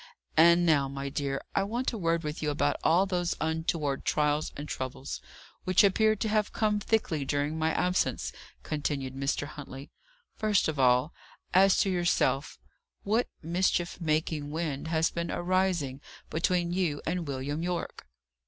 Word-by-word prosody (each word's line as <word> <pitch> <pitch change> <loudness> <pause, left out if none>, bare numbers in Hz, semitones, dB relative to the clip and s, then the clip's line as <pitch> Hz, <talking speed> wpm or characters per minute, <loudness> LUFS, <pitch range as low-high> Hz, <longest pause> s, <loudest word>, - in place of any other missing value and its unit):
"And 170 +2 +6
now, 145 -4 +3
my 140 0 -5
dear, 140 0 -2
I - - +2
want 235 +6 -1
a - - -3
word 165 -1 +1
with 150 0 -4
you 150 - 0
about 145 0 +1
all 175 +4 +4
those 175 -3 -1
untoward 160 -3 -1
trials 150 0 +1
and 145 +1 -6
troubles, 70 - -5 0.4
which 185 +2 +4
appear 215 +2 +4
to 215 +2 -2
have 215 -1 +1
come 210 -1 +1
thickly 200 -9 0
during 145 +2 -1
my 160 0 +2
absence," 180 +3 0 0.3
continued 140 -3 -2
Mr. 140 +1 -1
Huntley. 140 -1 -9 0.4
"First 215 -3 +2
of 155 -3 -3
all, 125 +4 +3 0.4
as 195 +1 +6
to 195 - +1
yourself. 160 -6 +1 0.5
What 220 +4 +1 0.2
mischief 175 +1 0
making 155 -2 -1
wind 155 -2 -3
has 160 0 +1
been 170 0 -3
arising 175 -7 0 0.3
between 175 +1 +1
you 175 -6 -1
and 170 -1 -2
William 140 +3 -3
Yorke?" 175 - -4
160 Hz, 155 wpm, -29 LUFS, 145-180 Hz, 0.5 s, And